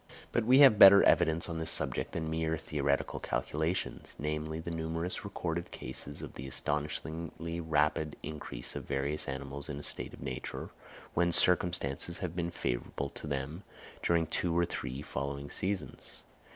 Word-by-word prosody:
But 115 - +1
we 130 +4 +7
have 130 -7 +8
better 100 +1 +10
evidence 85 -1 +3
on 85 -1 -4
this 80 - 0
subject - - +1
than 80 -1 -2
mere 80 0 -1
theoretical 70 -2 -1
calculations, 80 +4 -2
namely, 75 +1 -3
the 85 +1 -5
numerous 80 +3 -3
recorded 85 -4 -3
cases 70 +1 -5
of - - -8
the 65 - -7
astonishingly 80 +5 -3
rapid 75 -1 +1
increase 75 -5 -5
of - - -5
various 70 +2 -1
animals 70 +1 -5
in 70 - -4
a 75 - -7
state - - -3
of - - -16
nature, 65 -2 -5 0.4
when 85 0 +2
circumstances 85 -3 +4
have 90 -3 -4
been 85 -1 -1
favourable 70 -3 -3
to - - -7
them 70 +4 -3 0.4
during 85 -1 +2
two 85 +1 -1
or 85 - +4
three 65 -3 -5
following 70 +1 -4
seasons. 95 +1 -3
80 Hz, 155 wpm, -32 LUFS, 70-85 Hz, 0.4 s, better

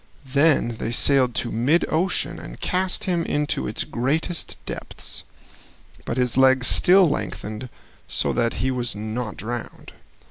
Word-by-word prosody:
Then 140 -4 +2
they - - -2
sailed 125 0 +4
to 120 - -1
mid 130 +10 +2
ocean 170 -1 0
and - - -10
cast 185 0 -1
him 175 -3 0
into 150 -2 -1
its 105 - -1
greatest 155 +7 -2
depths, - - -6 0.8
but - - -3
his 125 -1 +1
legs 130 -1 +5
still 185 +6 +6
lengthened 120 -4 -4 0.4
so - - -1
that 115 -1 +1
he 130 - +1
was 120 -3 -1
not 110 +1 -4
drowned. 120 +3 -6
130 Hz, 140 wpm, -23 LUFS, 120-160 Hz, 0.8 s, still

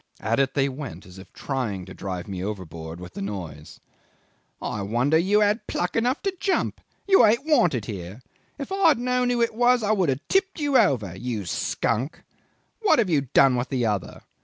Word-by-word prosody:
At 115 +3 0
it 135 -1 +1
they 140 -1 +2
went, 130 - -7
as 90 +1 -13
if 95 - -14
trying 115 -9 -3
to 90 - -10
drive 90 -3 -5
me 95 -2 -5
overboard 85 -5 -6
with 90 0 -10
the - - -6
noise!... 90 -7 -7 0.8
'I 105 - -4
wonder 120 +9 +1
you 195 +6 +3
had 210 +2 +1
pluck 175 - -2
enough 245 +4 0
to 390 -1 0
jump. 390 -1 -1 0.3
You 390 -1 +6
ain't 235 +6 +3
wanted 175 - +2
here. 100 +3 -7 0.3
If 280 +4 -6
I 390 -1 +3
had 310 - +5
known 250 +1 0
who 240 -1 +2
it 230 - 0
was, 245 +1 +3
I 210 - +1
would 190 -7 +2
have 135 +2 -2
tipped 385 -2 +1
you 290 -2 0
over 130 - +3
you 115 -1 -4
skunk! 115 - -2 0.6
What 430 - +4
have 210 -7 +1
you 150 -3 +3
done 135 -2 +6
with 125 +1 -2
the 125 -3 0
other? 105 -4 -2
135 Hz, 200 wpm, -24 LUFS, -, 0.8 s, You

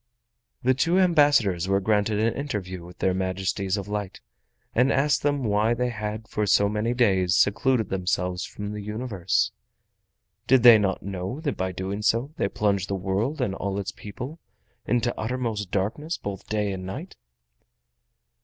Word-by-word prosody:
The 130 +1 +4
two 165 +7 +2
ambassadors 145 - +4
were 100 0 +2
granted 105 +1 +1
an 115 +1 +2
interview 95 -11 -4
with 90 0 -12
their 95 - +1
Majesties 95 +1 -1
of 100 -1 -5
Light 105 -2 -4 0.5
and 125 +4 +3
asked 140 +1 +2
them 145 -2 0
why 110 +1 +2
they 125 +1 0
had 110 -1 -5
for 105 -1 -1
so 100 0 +4
many 110 +3 -1
days 95 -7 +3
secluded 110 +3 +2
themselves 90 -1 -1
from 105 0 -6
the 105 0 -5
Universe? 105 -2 -1 1.0
Did 130 -2 +5
they 120 -3 +10
not 95 -2 -1
know 95 +6 -4
that 145 -5 -2
by 95 0 -2
doing 95 +3 -4
so 115 +6 +1
they - - +1
plunged 100 -3 0
the 100 - 0
world 100 +10 -1
and 105 -6 0
all 100 0 -3
its 100 -1 -3
people 125 +10 -8 0.5
into 120 0 +1
uttermost 110 -4 -2
darkness 115 - -2
both 100 -2 -7
day 105 -2 0
and 95 -1 -6
night? 135 - -7
105 Hz, 165 wpm, -25 LUFS, 95-120 Hz, 1.0 s, they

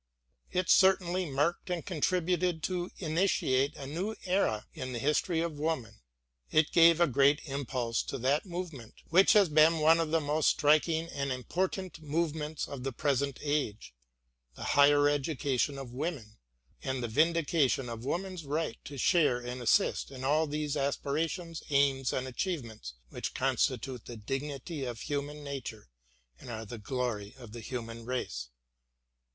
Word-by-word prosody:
It 185 0 0
certainly 185 -2 +4
marked 145 +7 0
and 175 -3 -2
contributed 180 -1 0
to 180 -1 -2
initiate 155 -5 +1
a 140 - -7
new 180 +10 -3
era 180 - +1
in 130 0 -5
the - - -2
history 150 +6 +1
of 165 -3 -3
woman; 130 -9 -2 0.5
it 155 -1 +3
gave 170 0 +6
a 170 - +6
great 140 +1 +4
impulse 130 -5 -2
to - - -4
that 135 +4 +1
movement 165 -10 -6
which 190 +8 +6
has 205 -3 +6
been 155 +1 +5
one 160 +2 +5
of 165 -2 0
the 165 +1 +3
most 150 0 +2
striking 160 +2 +3
and 140 -3 -3
important 180 +7 -3
movements 155 0 -2
of 135 -3 -7
the 135 - -2
present 140 +1 0
age 125 - -2 0.3
— - - -32
^the - - -6
higher 145 0 +6
education 140 -1 0
of 130 -3 -8
women 130 -7 -4 0.4
and 130 -1 -2
the - - -1
vindication 150 -1 +2
of 115 -1 -6
woman's 180 +4 -3
right 150 -2 -3
to 140 - -8
share 150 -2 +3
and 125 +1 -6
assist 120 - +2
in 130 -1 -8
all 155 +4 +2
those 150 0 -2
aspirations, 160 +4 -2
aims, 140 -2 +2
and 130 0 -2
achievements 120 - -4
which - - -5
constitute 130 -1 0
the 120 - -8
dignity 135 +5 -4
of 120 -3 -5
human 145 +1 -4
nature 130 - -6 0.5
and - - -11
are 110 -1 -5
the 115 +2 -8
glory 110 -2 -3
of 120 -4 -11
the 120 +1 -8
human 115 -1 -6
race. 115 - -4
145 Hz, 155 wpm, -31 LUFS, 125-165 Hz, 0.5 s, gave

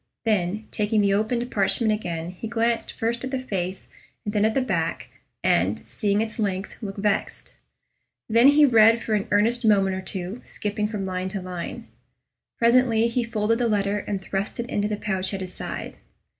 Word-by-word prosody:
Then, 215 -1 0
taking 210 0 +1
the 200 -1 +3
opened 235 +4 0
parchment 215 +2 +2
again, 170 -5 -4
he 185 +5 -7
glanced 230 +1 0
first 235 +2 -2
at 260 - -3
the 265 - -1
face 190 -7 -4 0.4
and 205 - -3
then 210 0 +3
at 220 - +1
the 270 - +3
back, 170 -9 -2 0.3
and, - - +2
seeing 205 -1 0
its 225 +1 -4
length, 195 -2 -2
looked 195 -2 -6
vexed. 200 0 -1 0.7
Then 230 +3 +5
he 290 +1 +7
read 230 -2 +6
for 220 - -2
an 205 -2 0
earnest 225 +4 +2
moment 195 -3 +3
or 190 - -4
two, 190 +3 -2
skipping 210 0 -3
from 210 -3 -4
line 185 0 -3
to 195 0 -4
line. 180 -2 -6 0.7
Presently 235 -1 +4
he 240 +1 0
folded 230 0 0
the 240 - +2
letter 205 -1 +1
and 200 -1 -3
thrust 195 +3 -4
it 235 - -2
into 205 0 0
the 210 -1 -2
pouch 190 -2 -2
at 190 - -5
his 185 -1 -5
side. - - -6
210 Hz, 185 wpm, -24 LUFS, 195-230 Hz, 0.7 s, he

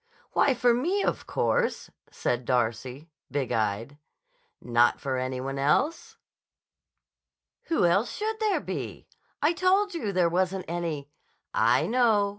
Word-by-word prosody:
"Why, 270 - +3
for 245 0 +3
me, 350 +12 0
of - - -2
course," - - 0 0.2
said 125 +1 -2
Darcy, 125 +5 -2 0.2
big 140 -3 -2
eyed. 110 +6 -1 0.6
"Not 120 0 +2
for 130 -2 -2
any 130 0 -2
one 135 +1 -4
else?" 150 - 0 1.5
"Who 325 - +2
else 195 +7 +2
should 435 +1 -3
there 430 -2 +1
be? - - -6 0.4
I 305 +3 +4
told 380 +3 +2
you 260 -12 -2
there 180 -2 +3
wasn't 185 +2 0
any—" 160 -4 -4 0.4
"I - - +3
know. 225 -4 +3
175 Hz, 130 wpm, -27 LUFS, -, 1.5 s, I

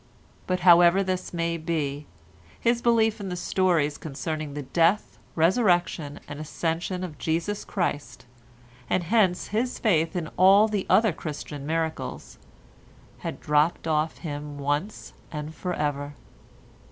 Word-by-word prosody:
But 185 -1 0
however 175 +2 +6
this 185 -1 -3
may 170 -1 -1
be, 150 -3 -3 0.5
his 235 0 +1
belief 225 -2 +3
in 200 -2 -5
the 180 - -3
stories 175 -5 +1
concerning 155 0 -5
the 145 - -4
Death, 170 +9 +1 0.2
Resurrection 175 -4 +2
and 145 - -7
Ascension 165 +4 -3
of 155 -5 -7
Jesus 170 +6 -1
Christ, 145 -11 -3 0.6
and 185 - +1
hence 185 -1 +2
his 235 +5 -1
faith 165 -7 +1
in 170 -3 -2
all 195 +4 +7
the 210 -3 -2
other 220 -4 +4
Christian 150 -2 -6
miracles, 160 0 -3 0.8
had - - -5
dropped 150 +3 +1
off 155 0 0
him 145 -2 -6
once 145 +9 -3 0.2
and 150 0 -5
for 180 +2 -4
ever. 145 -1 -2
170 Hz, 130 wpm, -26 LUFS, 150-185 Hz, 0.8 s, all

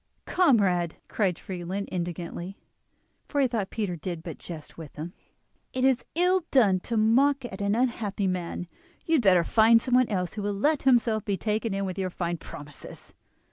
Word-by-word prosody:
"Comrade," 195 - +2
cried 195 -5 0
Friedlin 185 +2 -5
indignantly, 175 +1 -5 0.7
for 290 - -1
he 270 - +4
thought 225 -5 -2
Peter 205 -6 -2
did 170 0 -6
but 165 -3 -7
jest 160 -4 -9
with 160 -3 -10
him, 160 +4 -6 0.6
"it 255 0 +1
is 265 -2 +3
ill 360 +2 +3
done 205 -9 +4
to 230 +5 -3
mock 260 +5 +3
at 205 -4 -7
an 200 +1 +1
unhappy 225 -5 -1
man; 180 -1 -2 0.4
you 330 - 0
had 310 - +5
better 185 -5 +5
find 225 +5 +5
someone 250 +1 +2
else 180 -4 -2
who 210 - -5
will 205 0 -1
let 295 +9 +1
himself 230 -4 +3
be 200 -2 -1
taken 220 +2 -1
in 195 0 -1
with 190 0 -4
your 185 -1 -1
fine 175 -1 -3
promises." 145 -2 -11
200 Hz, 180 wpm, -27 LUFS, 180-235 Hz, 0.7 s, had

